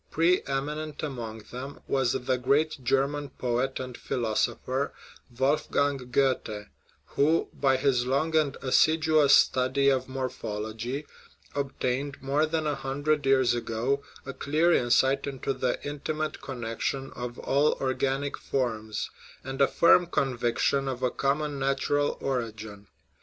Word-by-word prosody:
Pre 170 +3 +3
eminent 150 +3 -3
among 115 -6 -5
them 130 +3 -7
was 135 -3 +1
the 125 0 -1
great 140 +2 +1
German 140 +3 0
poet 125 +2 -1
and 130 -1 -6
philosopher, 120 +4 -1 0.4
Wolfgang 140 +1 +1
Goethe, 125 -5 0 0.4
who, 155 +4 +1
by 135 -2 +2
his 130 -2 +1
long 145 +5 +1
and 150 -3 +2
assiduous 155 +1 +5
study 130 +2 +3
of 130 -1 0
morphology, 125 0 -4 0.5
obtained, 140 0 -2
more 140 +4 +1
than 160 0 -1
a 150 - +1
hundred 140 +2 -1
years 130 -3 +4
ago, 120 +4 -1 0.2
a 140 - -5
clear 160 +4 +2
in 120 -5 +2
sight 135 +3 +3
into 135 0 -2
the 125 -2 -1
intimate 155 +2 -3
connection 130 +1 -3
of 120 0 -6
all 145 +3 +2
organic 135 +1 -1
forms, 110 -5 -2 0.3
and 135 +1 -4
a 140 - +6
firm 175 +1 +5
conviction 135 -1 0
of 130 -1 -3
a 125 - +2
common 145 +1 -1
natural 140 +1 0
origin. 110 -6 -4
135 Hz, 130 wpm, -27 LUFS, 125-145 Hz, 0.5 s, a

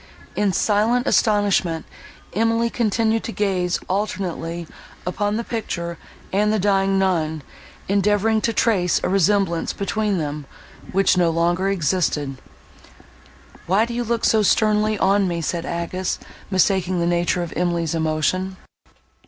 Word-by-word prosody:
In 205 -1 +1
silent 220 +6 +2
astonishment, 200 -6 +2 0.5
Emily 230 +3 +1
continued 225 0 +1
to - - -4
gaze 185 -4 0
alternately 180 -4 -3 0.4
upon 205 +3 -1
the 235 - -2
picture 170 -8 -4 0.3
and 210 +2 +2
the 215 - +2
dying 195 -1 +2
nun, 160 -5 0 0.4
endeavouring 205 +2 +2
to 230 - +1
trace 200 -5 +2
a - - 0
resemblance 195 -2 +1
between 205 0 -1
them, 150 -3 -4 0.4
which 195 -1 +3
no 175 -2 +3
longer 175 +3 +1
existed. 150 -6 0 1.3
"Why 195 +6 +3
do 235 - -6
you 240 +1 -1
look 235 0 -1
so 220 - +4
sternly 215 +1 +2
on 200 0 +3
me?" 170 -1 -2
said 170 +1 -3
Agnes, 170 +2 -2 0.3
mistaking 185 -1 +1
the 170 - +1
nature 175 +1 +1
of 170 - -6
Emily's 170 -2 0
emotion. 165 +4 -1
190 Hz, 130 wpm, -22 LUFS, 170-210 Hz, 1.3 s, so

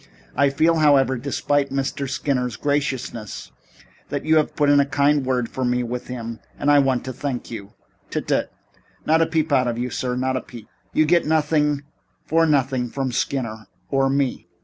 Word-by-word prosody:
I 140 0 +4
feel, 160 +4 +2
however, 140 -4 +4
despite 140 +2 0
Mr. 135 0 -2
Skinner's 130 -4 -1
graciousness, 125 - -3 0.6
that - - -3
you 160 0 +4
have 155 - +1
put 145 - +2
in 145 0 +5
a 140 - +4
kind 145 +1 +2
word 125 -2 0
for 130 - -4
me 125 0 +1
with 120 +1 -5
him, 115 -2 -6 0.2
and 145 - +2
I 145 - +6
want 135 -3 +1
to 130 - -4
thank 125 -2 -4
you 105 -3 -8 0.2
" - - -39
"Tut, - - -3
tut. - - 0 0.5
Not 160 +1 +4
a 165 - +3
peep 160 -1 0
out 130 -3 +3
of 120 -1 -1
you, 125 +1 -2
sir. 125 -1 -2
Not 130 +1 0
a - - -3
peep. 115 -3 -12 0.2
You 155 - +3
get 170 0 +3
nothing 150 -2 +2 0.4
for 165 0 +3
nothing 130 -4 +1
from 135 +1 -2
Skinner 115 -4 -2 0.2
or 135 -1 +2
me. 135 -2 -1
135 Hz, 195 wpm, -22 LUFS, 125-145 Hz, 0.6 s, I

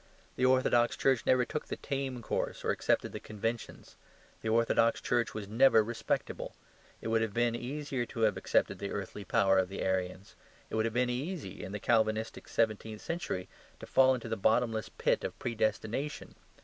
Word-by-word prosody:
The 130 - +3
orthodox 130 -2 +3
Church 130 -3 +2
never 125 -1 +4
took 150 - -4
the - - -3
tame 135 -3 -3
course - - -2
or - - +3
accepted - - +1
the - - -5
conventions; 115 +2 -5 0.4
the 110 - -2
orthodox 115 0 +3
Church 120 -1 0
was 105 -2 -5
never 115 +1 +5
respectable. 115 +2 -3 0.5
It - - -4
would 115 0 +2
have 110 -2 -2
been 120 0 +2
easier 130 0 -3
to 115 - -6
have 110 -1 +4
accepted - - +1
the 100 - -3
earthly 100 +1 -5
power 95 -2 +3
of 95 -1 0
the 95 - -4
Arians. 95 +1 -2 0.4
It - - -2
would 110 0 +2
have 115 - -1
been 125 0 +2
easy, 140 - -4
in 95 - -6
the 105 - -4
Calvinistic 110 0 +1
seventeenth 110 -1 -1
century, 165 - -3 0.3
to - - -8
fall 130 0 +5
into 120 -2 -6
the 110 - -1
bottomless 110 +1 +1
pit - - 0
of - - -4
predestination. 115 +4 -2
115 Hz, 180 wpm, -31 LUFS, 110-125 Hz, 0.5 s, never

